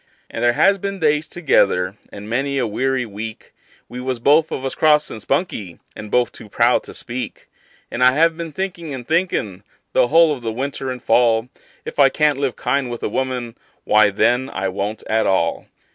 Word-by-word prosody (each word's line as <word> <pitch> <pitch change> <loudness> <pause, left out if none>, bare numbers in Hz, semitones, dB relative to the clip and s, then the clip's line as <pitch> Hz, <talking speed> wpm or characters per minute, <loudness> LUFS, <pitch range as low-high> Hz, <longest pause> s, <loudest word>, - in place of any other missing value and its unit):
And - - -4
there 120 0 +4
has 195 +9 +3
been 195 +1 -4
days 150 -2 +1
together 100 - +1 0.2
and 100 +1 -9
many 135 +5 -1
a 130 - +1
weary 130 +4 -1
week 110 +1 -8 0.3
We 125 - -8
was 130 -1 -2
both 150 +6 +3
of 135 - -4
us 135 - -2
cross 150 -1 +3
and 110 - -8
spunky, 110 - -2 0.2
and 105 - -8
both 120 0 +2
too 105 - -12
proud 120 +4 +3
to - - -11
speak; 125 +1 -5 0.4
And 125 - -1
I 125 0 +6
have 165 +3 +3
been 165 -1 -6
thinkin' 170 -2 -5
and 125 -2 -9
thinkin', 160 - -1 0.3
the - - +4
whole 165 +2 +5
of 135 - -7
the 115 -1 -3
winter 135 +2 -4
and 125 -1 -6
fall, 115 0 +3 0.4
If - - -7
I 140 -1 +7
can't 150 0 +1
live 135 -3 -1
kind 140 -3 -1
with 120 -1 -6
a - - -1
woman, 125 -1 -3 0.3
why, 105 -1 +4
then, 120 +6 +1
I 95 -6 -2
won't 100 +3 -4
at 110 0 +1
all. 85 -3 0
125 Hz, 200 wpm, -20 LUFS, 110-150 Hz, 0.4 s, I